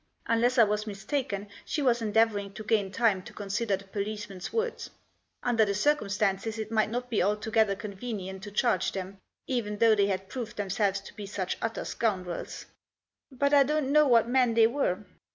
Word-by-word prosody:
Unless 240 +3 +2
I 235 - +8
was 210 0 0
mistaken 205 0 -3 0.2
she 300 - -2
was 240 -3 +3
endeavouring 210 -2 +1
to 215 - -7
gain 205 -3 +1
time 205 -2 +2
to - - -12
consider 205 0 -1
the 195 - -13
policeman's 200 -1 -5
words. 460 +1 -2 0.5
Under 235 -3 +3
the 200 -2 0
circum 290 -1 +1
stances 205 +1 0
it 220 0 -5
might 215 -1 +2
not 245 +2 -4
be 220 - +2
altogether 210 +1 +2
convenient 195 -2 -6
to 205 +1 -8
charge 235 +4 +1
them, 190 0 -6 0.3
even 220 -5 -2
though 225 0 +5
they 200 -2 +3
had 190 -1 -2
proved 235 +1 -6
themselves 200 -1 0
to - - -12
be 205 -2 -7
such 190 -2 -3
utter 225 0 -2
scoundrels. 185 -6 -3 0.3
" - - -64 0.3
But 280 +2 0
I 285 - +8
don't 285 0 +1
know 300 0 +5
what 235 -3 +5
men 245 -2 +3
they 225 -1 +7
were." 225 -6 0
215 Hz, 190 wpm, -28 LUFS, 200-235 Hz, 0.5 s, I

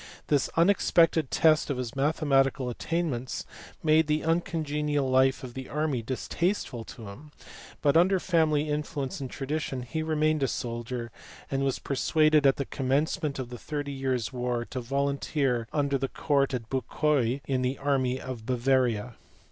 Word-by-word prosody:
This 145 -3 +2
unexpected 165 -4 +4
test 155 -1 +3
of 140 - -1
his 125 -1 -4
mathematical 135 -3 +2
attainments 140 -3 -2 0.4
made 155 0 +4
the 150 0 +1
uncongenial 150 -4 0
life 130 +1 +3
of 125 -2 -7
the 130 0 -7
army 150 -4 -1
distasteful 130 - -2
to 110 -3 -10
him, 145 +10 -12 0.5
but 145 0 +4
under 185 +3 +5
family 155 -4 +2
influence 150 -2 -3
and 130 - -4
tradition 140 -2 -3
he 160 +6 -3
remained 155 -1 +1
a 135 - +2
soldier, 120 0 -4 0.4
and 135 0 0
was 135 -2 0
persuaded 155 +1 +3
at 135 - +4
the 140 - -3
commencement 145 +4 -1
of 130 -2 -5
the 120 -1 -8
thirty 145 -2 -4
years 130 -3 -2
war 125 -1 -2
to 130 - -3
volunteer 140 -1 0
under 140 -2 0
Count 135 +1 +1
de 125 - -1
Bucquoy 130 +2 0
in 130 -2 0
the 130 +1 -1
army 130 -2 0
of 125 -3 -6
Bavaria. 125 -2 +1
135 Hz, 150 wpm, -28 LUFS, 125-150 Hz, 0.5 s, under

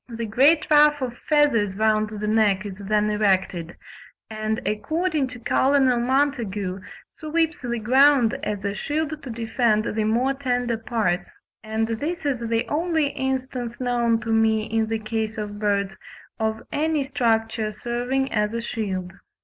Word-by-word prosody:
The 230 -1 -4
great 275 +9 +4
ruff 295 0 +6
of 245 -2 -4
feathers 235 -11 +3
round 215 0 +2
the 210 -1 -5
neck 210 -2 +2
is 200 - -5
then 210 +1 +1
erected, 190 -5 0 0.5
and 215 +1 -2
according 310 - 0
to 250 -1 -10
Col. 275 +4 +2
Montagu 240 -7 0 0.4
"sweeps 325 +2 -1
the 240 -2 -2
ground 255 +1 +4
as 205 -2 -3
a 200 - -1
shield 305 +6 -3
to 265 - -8
defend 225 -1 +1
the 220 - +1
more 240 +5 +1
tender 245 -4 -1
parts"; 210 -6 -1 0.3
and 220 +1 -1
this 295 +9 -3
is 275 -4 0
the 230 0 0
only 320 -1 0
instance 260 -3 -3
known 240 -2 +1
to 225 0 -3
me 220 -1 +3
in 220 0 -1
the 225 0 -1
case 220 0 -3
of 205 -1 -5
birds 200 -2 0 0.4
of 220 0 -1
any 310 -1 0
structure 225 -5 0
serving 245 +5 -2
as 210 0 0
a 230 - -2
shield. 190 -6 -3
230 Hz, 150 wpm, -23 LUFS, 215-270 Hz, 0.5 s, ruff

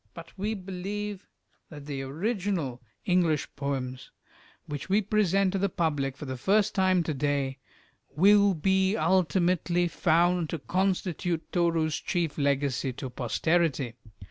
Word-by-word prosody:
But 165 0 -11
we 210 +3 -2
believe 195 +1 -5 0.4
that 145 -3 -10
the 140 -2 -4
original 165 - -2 0.2
English 175 -5 +2
poems, 135 -2 -4 0.6
which 145 +3 -6
we 200 +2 +4
present 195 -2 +2
to 195 - 0
the 200 +1 +1
public 145 -6 -1
for 150 - -7
the 130 -1 -5
first 200 - +2
time 185 -2 +3
to 160 - -2
day, 140 -1 -1 0.6
will 200 +3 +5
be 190 +4 +2
ultimately 175 0 +2
found 175 0 +2
to 165 - -2
constitute 180 -1 -1
Toru's 165 -3 +1
chief 165 -4 -2
legacy 140 -2 0
to 130 0 -6
posterity. 140 +1 0
170 Hz, 130 wpm, -28 LUFS, 145-190 Hz, 0.6 s, will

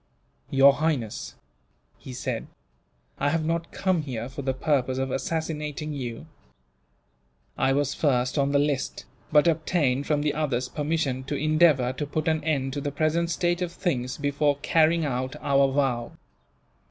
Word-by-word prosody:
"Your 135 +1 +6
Highness," 120 - -2 0.6
he 130 - -9
said, 125 -1 -4 0.7
"I 145 - +2
have 160 +1 0
not 165 +1 -2
come 185 -4 0
here 125 -4 -5
for 140 +2 -6
the 135 -1 0
purpose 130 -1 0
of 135 0 -1
assassinating 150 +1 -3
you. 125 -2 -5 1.3
I 135 +1 +2
was 140 0 +1
first 125 -4 +1
on 140 -1 +1
the 140 - +3
list, 145 -2 -1 0.3
but 150 +1 +5
obtained 150 -4 +1
from 150 -1 +1
the 150 - +1
others 130 -5 -1
permission 150 -4 -1
to 145 - -3
endeavour 155 -4 +3
to 145 +3 -4
put 155 +2 -2
an 160 -1 +1
end 135 -4 0
to 145 - -3
the 145 - -2
present 155 +4 0
state 175 +1 0
of 175 -1 -1
things, 130 -9 -2
before 145 0 +1
carrying 160 0 +3
out 130 -1 -2
our 140 -1 +3
vow. 130 -4 0
145 Hz, 155 wpm, -26 LUFS, 130-155 Hz, 1.3 s, Your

